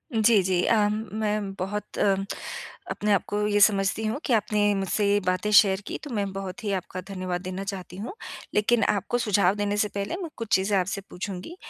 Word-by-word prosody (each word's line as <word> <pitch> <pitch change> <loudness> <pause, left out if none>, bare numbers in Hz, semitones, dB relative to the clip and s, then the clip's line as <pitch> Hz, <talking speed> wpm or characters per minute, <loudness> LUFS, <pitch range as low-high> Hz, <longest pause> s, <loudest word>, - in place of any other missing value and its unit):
जी, 220 -2 +5
जी 180 -1 +1
अ, 210 -2 +4
मैं 210 -1 -2
बहुत 200 +2 -4
अ, 195 -1 +4 0.8
अपने 210 0 -1
आप 195 - +2
को 205 - -1
ये 205 0 +2
समझती 200 +1 +3
हूँ 220 +6 -1
कि 255 - +1
आपने 210 -1 +2
मुझसे 195 +2 0
ये 205 - +4
बातें 185 +3 0
शेयर 200 -1 +6
की - - -3
तो 295 - -7
मैं 200 -2 -1
बहुत 195 +4 -6
ही 205 - -1
आपका 185 0 -4
धन्यवाद 185 -2 -3
देना 185 +1 -5
चाहती 185 -2 -6
हूँ। 220 - -5 0.4
लेक़िन 220 +2 +3
आपको 205 +4 0
सुझाव 200 -4 +2
देने 205 0 -1
से 210 - +2
पहले 200 +11 -2
मैं 335 - -4
कुछ 230 -2 -3
चीज़ें 195 +1 +2
आपसे 195 +2 -1
पूछूँगी। 195 - -6
205 Hz, 200 wpm, -26 LUFS, 190-210 Hz, 0.8 s, शेयर